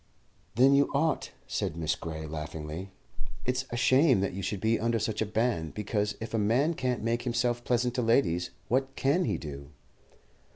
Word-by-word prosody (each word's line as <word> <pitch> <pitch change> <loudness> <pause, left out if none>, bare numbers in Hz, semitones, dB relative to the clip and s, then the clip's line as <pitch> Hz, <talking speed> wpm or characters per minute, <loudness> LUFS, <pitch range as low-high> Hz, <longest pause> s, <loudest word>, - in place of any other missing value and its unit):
"Then 130 +4 +6
you 140 0 +4
ought," 160 +3 +1 0.2
said 80 - -2
Miss 80 -1 0
Gray, 80 -1 -6
laughingly. 75 +3 -6 0.6
"It's 125 +1 0
a 120 - -3
shame 130 0 +5
that 100 - -1
you 95 - -4
should 100 +1 -2
be 110 +3 +1
under 115 +1 +1
such 110 0 -2
a 110 - 0
ban, 110 -7 0
because 105 0 -1
if 110 - -6
a 115 - +1
man 125 +10 +2
can't 125 -6 -2
make 115 +1 0
himself 120 0 0
pleasant 125 0 +1
to 125 - 0
ladies, 90 -8 +2 0.2
what 135 +2 0
can 155 +7 +2
he - - 0
do?" 70 -2 -8
115 Hz, 180 wpm, -29 LUFS, 95-125 Hz, 0.6 s, Then